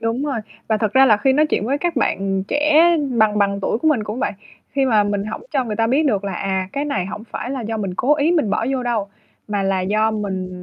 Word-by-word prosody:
Đúng 230 +5 -1
rồi. 275 -5 -2 0.3
Và 220 - +2
thật 215 -1 -1
ra 265 0 +6
là 215 -4 +5
khi 265 +5 +2
nói 300 +3 +3
chuyện 255 - -1
với 275 +4 0
các 345 -1 -2
bạn 195 -6 0
trẻ 300 +1 +3 0.4
bằng 215 -1 +3
bằng 200 -1 +1
tuổi 220 - -1
của 315 - +1
mình 255 -9 +1
cũng 215 +3 -5
vậy, - - -1 0.4
khi 275 -1 +1
mà 220 -5 +3
mình 205 -1 -1
hổng 215 - -6
cho 265 -3 +1
người 215 -2 -4
ta 225 - +2
biết 280 +6 +2
được 205 -7 0
là, 200 - -3
à, 190 0 -2
cái 280 - -2
này 200 -11 -2
hổng 210 +3 -7
phải 245 - -5
là 270 -1 -3
do 225 -1 -3
mình 195 -4 -3
cố 270 +10 +2
ý 300 +3 +1
mình 300 - +1
bỏ 215 +2 0
vô 265 -2 -1
đâu, 230 -5 -1 0.4
mà 205 -1 -1
là 195 -1 0
do 215 +4 +1
mình 195 -4 -3
220 Hz, 270 wpm, -20 LUFS, 200-270 Hz, 0.4 s, ra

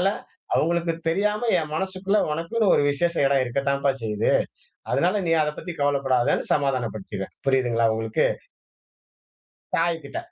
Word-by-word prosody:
அதனால 185 - +2 0.5
அவங்களுக்கு 170 +1 +1 0.2
தெரியாம, 210 +4 0 0.2
என் 155 -1 -6
மனசுக்குள்ள 190 +3 0
உனக்குன்னு 185 +7 +1
ஒரு - - +3
விசேஷ 170 +4 0
இடம் 135 -1 +3
இருக்கத்தாம்ப்பா 140 +2 0
செய்யுது. 105 0 0 0.6
அதனால 170 +10 +2
நீ 165 - 0
அதை 150 -1 +1
பத்தி 175 - -6
கவலைப்படாதேன்னு 135 -3 +1
சமாதானப்படுத்திருவேன். 115 -8 -2
புரியுதுங்களா 125 -4 +2
உங்களுக்கு? 110 0 0 1.5
தாய்கிட்ட,. 170 - -1
145 Hz, 115 wpm, -24 LUFS, 130-170 Hz, 1.5 s, ஒரு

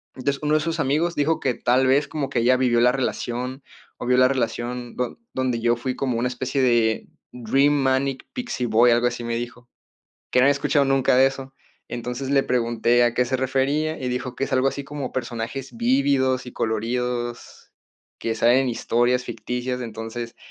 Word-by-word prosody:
Entonces, 140 +2 -2
uno 150 +1 +1
de 155 - +4
sus 165 +1 -2
amigos 160 +5 +1
dijo 155 +2 +1
que 130 -3 0
tal 130 +2 +2
vez 140 +3 +3
como 145 -3 -3
que 120 - 0
ella 125 +2 +4
vivió 120 -2 +2
la 125 - +5
relación, 125 0 -3 0.3
o - - -6
vio 125 - +4
la 130 - +6
relación 120 -1 -3
don 125 -1 -3 0.2
donde 130 -3 -1
yo 120 +1 +3
fui 125 +2 -3
como 125 -4 -1
una 125 - +1
especie 130 +2 -2
de 115 -3 +2 0.2
Dream 135 +5 +2
Manic 135 -1 0
Pixie 240 - -3
Boy, 115 +2 +5
algo 120 +1 +3
así 120 0 -4
me 115 0 -2
dijo 120 0 -7 0.6
que 125 - +3
no - - +5
había 140 - +6
escuchado 140 0 +1
nunca 135 -2 +3
de 130 +1 +6
eso. 135 0 -5 0.3
Entonces 125 +2 -4
le 140 -1 +4
pregunté 120 0 +2
a 120 - +1
qué 125 - +2
se 130 +2 -1
refería 135 +4 0
y 130 - -2
dijo 125 0 -4
que - - 0
es - - -7
algo 130 +1 +3
así 140 0 -5
como 145 -2 -5
personajes 125 +2 -5
vívidos 140 - +2
y 125 - -8
coloridos 120 +2 -3 0.5
que 115 -1 -2
salen 120 +3 +4
en 130 - 0
historias 120 +2 +1
ficticias, 125 +2 -4
entonces, 115 +1 -6
125 Hz, 195 wpm, -23 LUFS, 120-135 Hz, 0.6 s, la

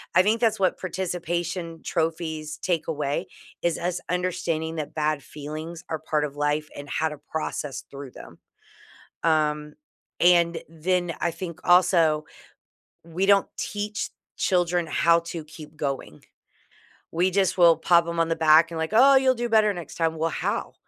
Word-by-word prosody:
I 185 - +7
think 215 +4 +2
that's 220 -3 +2
what 190 -1 +1
participation 175 -2 -3
trophies 160 -2 -2
take 170 -4 -1
away, 150 +3 -2 0.3
is 170 -1 0
us 180 +1 -2
understanding 175 -3 -1
that 155 -2 -5
bad 155 -1 0
feelings 155 +4 -8
are 160 - -2
part 155 -1 -1
of 145 -1 -4
life 150 +1 0
and 145 0 -9
how 160 +2 0
to 150 - -8
process 145 -3 -5
through 140 -1 -8
them. - - -13 0.8
Um, 150 -2 +1 0.5
and 170 -1 +4
then, 175 +2 -1
I 170 - +1
think 170 0 -7
also 170 -4 +4 0.8
we 170 +3 -1
don't 200 0 +4
teach 210 +1 -3 0.3
children 175 -2 +1
how 170 +1 +3
to 170 -1 -7
keep 155 0 -12
going. 140 - -4 0.9
We 180 +3 +2
just 190 0 +1
will 170 -2 +7
pop 170 -1 +3
them 170 0 -2
on 165 - +2
the 165 - 0
back 160 +1 +5
and 165 - -5
like, 160 0 -2
"Oh, 270 +4 +7
you'll 265 -1 +4
do 240 0 -3
better 215 -2 +4
next 175 -2 -8
time." 165 -1 0
"Well, 165 +1 0
how? - - -3
165 Hz, 160 wpm, -25 LUFS, 155-180 Hz, 0.9 s, I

